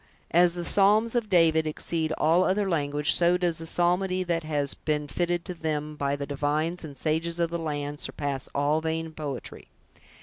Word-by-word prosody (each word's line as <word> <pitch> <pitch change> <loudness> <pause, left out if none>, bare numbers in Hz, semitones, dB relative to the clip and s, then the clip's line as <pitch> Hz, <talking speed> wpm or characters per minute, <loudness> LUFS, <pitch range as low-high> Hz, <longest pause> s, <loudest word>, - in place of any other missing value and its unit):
As 175 +1 +4
the 175 -1 -4
psalms 210 +4 +4
of 235 -3 -1
David 160 -3 +4
exceed 160 +1 -2
all 165 +4 +3
other 195 +2 +1
language, 150 -4 +1
so 175 +1 +4
does 175 -2 0
the 165 - -4
psalmody 180 +2 +1
that 170 -2 -1
has 145 -3 -1
been 150 -1 -2
fitted 175 +2 -1
to 180 - -4
them 155 -2 -3
by 140 -1 -1
the 140 0 -4
divines 150 +5 -2
and 145 -3 -9
sages 165 +3 0
of 170 -1 0
the 170 - -2
land, 145 -2 -4
surpass 140 -2 -2
all 145 +2 +1
vain 160 0 -3
poetry. 145 -5 -7
160 Hz, 180 wpm, -26 LUFS, 150-175 Hz, -, As